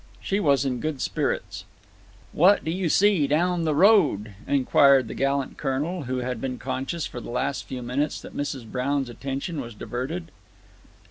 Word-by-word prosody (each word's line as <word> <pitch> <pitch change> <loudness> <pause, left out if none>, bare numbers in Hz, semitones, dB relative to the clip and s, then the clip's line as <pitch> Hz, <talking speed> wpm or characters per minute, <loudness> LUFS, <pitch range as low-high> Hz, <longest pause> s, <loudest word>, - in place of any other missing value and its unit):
She 195 - -1
was 140 -7 +3
in 125 -2 -1
good 155 -1 -3
spirits. - - -2 0.7
"What 190 +6 +4
do 160 - -1
you 180 -1 -1
see 195 -5 +4
down 170 +3 +1
the 155 -2 +1
road?" 155 - +4
inquired 140 -1 +4
the - - -6
gallant 140 0 -1
Colonel, 150 +4 -2
who 130 +1 -2
had 125 -2 -3
been 130 -2 -3
conscious, 130 +6 -3
for 120 - -7
the - - -9
last 135 +3 -2
few 125 -2 -5
minutes, 140 +5 -1
that - - -11
Mrs. 140 -4 -3
Brown's 130 +3 -1
attention 140 - -4
was 120 -3 -9
diverted. 145 +10 -5
140 Hz, 170 wpm, -25 LUFS, 130-160 Hz, 0.7 s, What